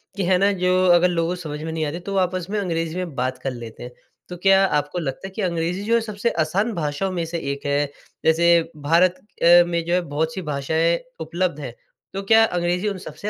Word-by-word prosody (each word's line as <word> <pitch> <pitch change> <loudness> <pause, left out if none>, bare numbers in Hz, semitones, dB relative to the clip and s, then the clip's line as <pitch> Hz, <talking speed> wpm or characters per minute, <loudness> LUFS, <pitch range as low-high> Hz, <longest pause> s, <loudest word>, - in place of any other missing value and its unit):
कि 200 - -2
है 180 +1 +3
ना, 200 +2 +3
जो 185 0 +2
अगर 175 +1 +5
लोगों 165 0 0
को - - -1
समझ 155 -4 -6
में 160 - -4
नहीं 160 -1 -2
आते 155 +4 -4
तो 195 +3 -6
वो - - 0
आपस 185 -1 -1
में 210 0 -1
अंग्रेज़ी 165 -3 -2
में 180 -6 -4
बात 130 0 -2
कर 135 - -1
लेते 120 -2 -9
हैं। 125 - -8 0.4
तो 180 - -7
क्या 195 0 +6
आपको 145 +4 -1
लगता 145 +4 -4
है - - -11
कि 215 - -3
अंग्रेज़ी 175 +1 -1
जो 230 - +1
है 230 - +3
सबसे 215 +1 -2
आसान 200 +8 -1
भाषाओं 160 +3 -2
में 170 -2 -2
से 170 +1 -4 0.2
एक 140 - -10
है? 145 +1 +1 0.4
जैसे 170 +1 +4
भारत 170 +5 +3 0.3
अ, 175 +1 +8
में 170 -1 -1
जो 170 - -1
है 180 - +3
बहुत-सी 160 +3 -3
भाषाएँ 160 +3 0 0.2
उपलब्ध 170 -1 -2
हैं 125 -5 -6 0.4
तो 195 - -3
क्या 225 +2 +5
अंग्रेज़ी 180 +1 -1
उन 200 - -4
सबसे 185 +3 -7
170 Hz, 235 wpm, -22 LUFS, 155-185 Hz, 0.4 s, अ